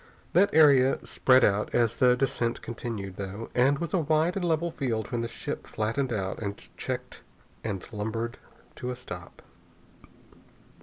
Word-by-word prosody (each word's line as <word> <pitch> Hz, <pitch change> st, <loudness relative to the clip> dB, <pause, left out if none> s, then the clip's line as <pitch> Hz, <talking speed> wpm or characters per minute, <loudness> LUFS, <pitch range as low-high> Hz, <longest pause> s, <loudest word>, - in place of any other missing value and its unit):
That 195 Hz, +4 st, +5 dB
area 140 Hz, -4 st, +6 dB
spread 130 Hz, 0 st, +4 dB
out 105 Hz, +1 st, +2 dB
as 115 Hz, -2 st, +2 dB
the 125 Hz, -1 st, +5 dB
descent 120 Hz, -2 st, -1 dB
continued, 110 Hz, -5 st, -5 dB
though, 100 Hz, +3 st, -6 dB
and 135 Hz, +3 st, +4 dB
was 170 Hz, +1 st, -4 dB
a 190 Hz, -, +3 dB
wide 160 Hz, +2 st, +2 dB
and 195 Hz, -, -2 dB
level 170 Hz, 0 st, +1 dB
field 115 Hz, -8 st, -2 dB
when 120 Hz, -, -1 dB
the 115 Hz, -, -2 dB
ship -, -, -5 dB
flattened 120 Hz, +5 st, -1 dB
out 95 Hz, -4 st, -2 dB
and 100 Hz, -2 st, -4 dB, 0.2 s
checked -, -, -5 dB, 0.4 s
and 100 Hz, -4 st, -3 dB
lumbered 110 Hz, +3 st, -3 dB, 0.4 s
to 125 Hz, -, -4 dB
a 125 Hz, -, -3 dB
stop. 125 Hz, -, -9 dB
120 Hz, 155 wpm, -28 LUFS, 110-140 Hz, 0.4 s, area